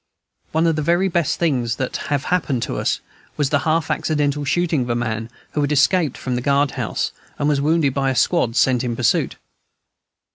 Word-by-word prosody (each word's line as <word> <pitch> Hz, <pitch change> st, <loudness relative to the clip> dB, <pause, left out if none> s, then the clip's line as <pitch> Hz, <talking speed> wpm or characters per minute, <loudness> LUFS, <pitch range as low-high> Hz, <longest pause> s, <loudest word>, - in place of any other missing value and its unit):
One 160 Hz, +1 st, +2 dB
of 165 Hz, -2 st, +2 dB
the -, -, 0 dB
very 175 Hz, +5 st, +2 dB
best 170 Hz, -3 st, 0 dB
things 125 Hz, -8 st, 0 dB
that 130 Hz, +1 st, -3 dB
have 145 Hz, -1 st, 0 dB
happened 140 Hz, -9 st, 0 dB
to -, -, -3 dB
us -, -, 0 dB, 0.4 s
was 145 Hz, -2 st, 0 dB
the 145 Hz, -, +3 dB
half 160 Hz, 0 st, +1 dB
accidental 145 Hz, -2 st, 0 dB
shooting 165 Hz, -1 st, +1 dB
of 125 Hz, -, -3 dB
a 120 Hz, -, +1 dB
man 110 Hz, -1 st, -2 dB, 0.2 s
who 150 Hz, -, -1 dB
had 145 Hz, 0 st, 0 dB
escaped 150 Hz, +1 st, +2 dB
from 130 Hz, -, -3 dB
the 125 Hz, -, -1 dB
guard 140 Hz, +1 st, +2 dB
house, -, -, -2 dB, 0.3 s
and 145 Hz, -, 0 dB
was 145 Hz, -2 st, +2 dB
wounded 150 Hz, -2 st, +2 dB
by 135 Hz, -1 st, 0 dB
a 130 Hz, -, -1 dB
squad 125 Hz, -3 st, +2 dB
sent 130 Hz, -2 st, +3 dB
in 120 Hz, -2 st, -2 dB
pursuit. 120 Hz, -1 st, +1 dB
145 Hz, 205 wpm, -21 LUFS, 125-160 Hz, 0.4 s, the